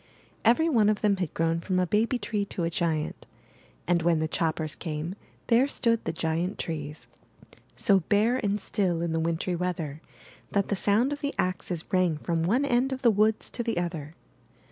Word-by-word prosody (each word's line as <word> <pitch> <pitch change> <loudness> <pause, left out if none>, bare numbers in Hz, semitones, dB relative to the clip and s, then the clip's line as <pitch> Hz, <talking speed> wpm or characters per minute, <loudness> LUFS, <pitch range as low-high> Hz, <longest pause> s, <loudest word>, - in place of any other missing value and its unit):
Every 245 +8 +4
one 225 -9 +4
of 215 - 0
them 205 -2 +3
had 180 -5 -2
grown 165 0 +1
from 185 +2 -1
a 185 - +3
baby 220 +7 +1
tree 210 -2 -2
to 185 - -4
a 165 - 0
giant; 160 -2 -2 0.6
and, 175 -1 +3
when 170 0 +3
the 160 0 0
choppers 160 -1 -1
came, 160 +1 -4 0.3
there 245 +3 +4
stood 230 -5 0
the - - 0
giant 165 +4 -1
trees, 150 -2 -5 0.7
so 200 -4 +4
bare 215 +7 +2
and 205 -4 0
still 180 -4 0
in 170 - -1
the 165 - 0
wintry 165 +2 -1
weather 165 -4 -3 0.5
that 200 -1 +1
the 200 - +1
sound 215 +8 +2
of 290 - -7
the 285 -1 -2
axes 180 -2 -2
rang 180 -4 +3
from 165 +1 -1
one 230 +12 +2
end 255 0 +2
of 265 0 -4
the 235 - +6
woods 215 +1 +2
to - - -3
the 230 -5 -2
other. 165 -3 -3
185 Hz, 190 wpm, -27 LUFS, 165-220 Hz, 0.7 s, the